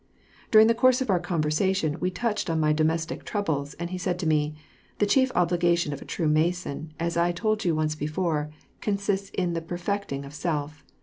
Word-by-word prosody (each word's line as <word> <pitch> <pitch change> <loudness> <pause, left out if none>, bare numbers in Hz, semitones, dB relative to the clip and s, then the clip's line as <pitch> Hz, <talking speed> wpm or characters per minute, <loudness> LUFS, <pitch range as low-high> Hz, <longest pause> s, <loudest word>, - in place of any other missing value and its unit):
During 220 0 +8
the 230 - +4
course 255 +2 +4
of 260 -6 0
our 180 - +3
conversation 165 0 0
we 180 - 0
touched 210 +2 -2
on 165 -1 +1
my 155 -1 +3
domestic 160 +1 0
troubles, 155 -9 -2
and 170 +1 -5
he 185 - -3
said 180 -1 -1
to 180 - -4
me: 150 -1 +1 0.4
*^The 205 - +3
chief 260 +4 +3
obligation 175 -2 +2
of 140 - -7
a - - -9
true 165 - -2
Mason, 155 0 0
as 170 0 -1
1 175 +1 +2
told 215 +4 0
you 170 -3 +1
once 155 0 0
before, 155 0 -1 0.3
consists 200 -1 -1
in 180 -2 -1
the 165 - -2
perfecting 175 -4 -3
of 140 - -10
self. 150 -2 -3
170 Hz, 195 wpm, -26 LUFS, 155-190 Hz, 0.4 s, During